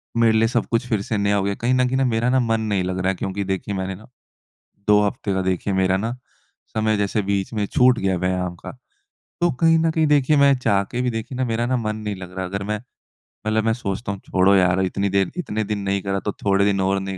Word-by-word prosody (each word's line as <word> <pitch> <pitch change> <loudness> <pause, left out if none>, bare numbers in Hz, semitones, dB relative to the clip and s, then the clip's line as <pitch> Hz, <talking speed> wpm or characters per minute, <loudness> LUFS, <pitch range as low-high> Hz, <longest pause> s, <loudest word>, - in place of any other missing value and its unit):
मेरे 115 -1 +4
लिए 115 +1 +4
सब 120 0 0
कुछ 115 +2 0
फ़िर 110 -5 0
से 105 +2 -2
नया 100 0 +1
हो 100 - +1
गया। 100 0 -1
कहीं 120 +2 +2
न 130 0 +3
कहीं 130 +1 0
न 135 -1 +2
मेरा 115 +1 +1
ना 130 +1 +3
मन 115 -2 +1
नहीं 95 -2 +1
लग 90 0 -3
रहा 95 0 +1
है 95 - 0
क्योंकि 95 +2 -3
देखिए 95 +1 -3
मैंने 95 0 -3
ना 110 +4 -15 0.8
2 105 0 +5
हफ़्ते 100 0 -2
का 95 - 0
देखिए 95 +1 -1
मेरा 95 0 +2
ना 110 +4 -2 0.6
समय 110 -1 +1
जैसे 100 +1 0
बीच 100 +1 -2
में 105 -2 0
छूट 125 +2 +3
गया 95 -1 0
व्यायाम 90 0 -1
का। - - -9 0.7
तो 175 0 +3
कहीं 165 0 +5
न 165 0 +2
कहीं 160 0 +1
देखिए 150 0 +3
मैं 140 -1 +5
चाह 100 -5 +2
के 120 +5 -5
भी 125 - 0
देखिए 115 +3 -5
ना 130 - 0
मेरा 115 0 -1
ना 130 +1 +1
मन 110 -3 -2
नहीं 105 -1 -4
लग 90 -1 -9
रहा। 95 - -2
अगर 100 +2 -4
मैं 105 +1 -2 0.7
मतलब 110 0 +1
मैं 115 - +3
सोचता 105 -2 -4
हूँ 100 - -6
छोड़ो 95 +1 +3
यार 90 0 +3
इतनी 100 +1 -1
देर 95 -1 +1
इतने 110 -11 -2
दिन 105 0 -3
नहीं 100 0 0
करा 100 0 -2
तो 105 - -3
थोड़े 100 0 +3
दिन 100 -1 +1
और 95 +1 +1
नहीं 95 0 -5
100 Hz, 260 wpm, -22 LUFS, 95-115 Hz, 0.8 s, 2